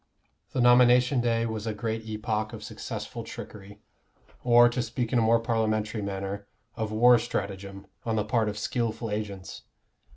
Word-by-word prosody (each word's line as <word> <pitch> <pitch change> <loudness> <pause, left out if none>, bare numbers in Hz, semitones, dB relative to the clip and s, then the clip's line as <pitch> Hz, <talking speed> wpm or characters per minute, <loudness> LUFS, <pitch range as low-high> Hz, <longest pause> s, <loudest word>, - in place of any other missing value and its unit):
The 130 - +1
nomination 125 +1 +5
day 115 -1 +1
was 110 -1 -4
a 110 - -2
great 110 +1 -3
epoch 110 0 -2
of 110 -2 -8
successful - - -6
trickery, 100 0 -10 0.6
or, 120 0 +7
to 120 +1 -1
speak 120 +1 -3
in 120 - +4
a - - +3
more 115 +1 +4
parliamentary 110 -1 -1
manner, 100 0 -4 0.3
of 110 -2 -3
war 120 +2 +6
stratagem, 100 -3 -5 0.2
on 115 -1 -1
the 105 -1 0
part 110 -1 +1
of 105 - -5
skilful 115 0 -2
agents. 100 -3 -5
110 Hz, 160 wpm, -27 LUFS, 105-120 Hz, 0.6 s, or